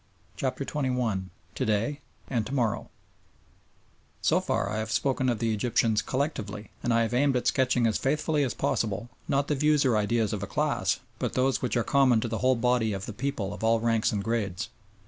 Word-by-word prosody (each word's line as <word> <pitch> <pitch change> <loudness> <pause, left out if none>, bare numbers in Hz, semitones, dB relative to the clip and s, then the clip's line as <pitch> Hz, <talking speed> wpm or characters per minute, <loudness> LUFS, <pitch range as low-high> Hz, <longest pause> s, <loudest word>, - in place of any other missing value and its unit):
CHAPTER 130 +5 -2
XXI 125 -10 -1 0.3
TO - - -2
DAY 110 +7 0 0.3
AND 115 -5 -1
TO 135 - -3
MORROW 115 -6 0 1.3
So - - +4
far - - 0
I 110 - -1
have 110 +1 -3
spoken 130 +3 +1
of 120 - +1
the 115 0 0
Egyptians 110 0 +2
collectively, 110 -7 -3
and 120 - 0
I 115 0 +4
have 115 +1 -2
aimed 135 +2 +3
at 125 - -3
sketching 130 -3 +2
as 110 -2 +1
faithfully 150 +2 +1
as 130 - -2
possible, 110 +2 -1 0.2
not 140 -1 +1
the - - +1
views 150 0 +3
or 125 -4 +3
ideas 110 0 +1
of 105 - -3
a 100 - -3
class - - 0 0.2
but - - -2
those 130 +1 +1
which 125 -1 0
are 120 - +2
common 130 -4 +4
to 120 - -1
the 110 -1 -3
whole 130 0 +3
body 120 -2 +1
of 95 0 -4
the 110 - -6
people 120 -5 -3
of 105 - -8
all 115 0 +4
ranks 115 -1 +2
and 100 -2 -2
grades. 110 -1 -2
120 Hz, 205 wpm, -28 LUFS, 110-130 Hz, 1.3 s, So